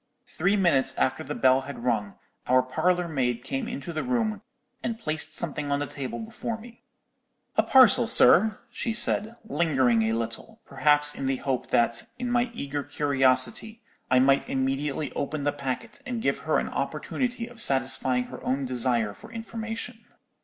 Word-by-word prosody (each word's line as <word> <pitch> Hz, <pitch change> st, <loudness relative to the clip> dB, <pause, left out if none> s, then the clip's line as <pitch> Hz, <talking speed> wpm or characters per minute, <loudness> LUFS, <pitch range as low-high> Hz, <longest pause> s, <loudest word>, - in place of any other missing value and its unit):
"Three 180 Hz, +5 st, 0 dB
minutes 170 Hz, -9 st, +2 dB
after 130 Hz, -, 0 dB
the 150 Hz, -, -5 dB
bell 130 Hz, 0 st, +4 dB
had 135 Hz, -2 st, -8 dB
rung, 110 Hz, -5 st, -1 dB, 0.3 s
our 130 Hz, 0 st, +4 dB
parlour 175 Hz, +7 st, 0 dB
maid 125 Hz, -6 st, -1 dB
came 135 Hz, 0 st, -3 dB
into 140 Hz, +5 st, -6 dB
the 155 Hz, -, -2 dB
room, 225 Hz, -5 st, -1 dB, 0.4 s
and 230 Hz, -1 st, -3 dB
placed 155 Hz, -4 st, -3 dB
something 150 Hz, -3 st, -2 dB
on 140 Hz, -, +2 dB
the 145 Hz, -, -2 dB
table 140 Hz, -3 st, -5 dB
before 225 Hz, 0 st, -5 dB
me. 235 Hz, +1 st, -14 dB, 0.7 s
"'A -, -, +5 dB
parcel, 245 Hz, -3 st, +6 dB
sir,' 215 Hz, +1 st, +5 dB
she 230 Hz, -, -2 dB
said, 220 Hz, 0 st, +3 dB
lingering 135 Hz, -, +2 dB
a 110 Hz, 0 st, +1 dB
little; 115 Hz, -, -5 dB
perhaps 150 Hz, 0 st, +2 dB
in 135 Hz, -, -4 dB
the 135 Hz, -, +1 dB
hope 130 Hz, -1 st, -2 dB
that, 115 Hz, 0 st, +2 dB
in 245 Hz, 0 st, -3 dB
my 245 Hz, 0 st, +2 dB
eager 145 Hz, -5 st, -3 dB
curiosity, 145 Hz, -, +1 dB, 0.3 s
I 130 Hz, -, +5 dB
might 135 Hz, +1 st, +3 dB
immediately 135 Hz, +3 st, -1 dB
open 145 Hz, +1 st, -3 dB
the 145 Hz, -, +1 dB
packet, 140 Hz, -, -5 dB
and 250 Hz, -3 st, -4 dB
give 230 Hz, -, 0 dB
her -, -, +4 dB
an -, -, -1 dB
opportunity 245 Hz, -2 st, -3 dB
of 240 Hz, -1 st, -5 dB
satisfying 130 Hz, -3 st, +1 dB
her -, -, -10 dB
own 135 Hz, +1 st, -1 dB
desire 120 Hz, -4 st, 0 dB
for 220 Hz, -, -14 dB
information. 225 Hz, 0 st, -6 dB
145 Hz, 165 wpm, -26 LUFS, -, 0.7 s, parcel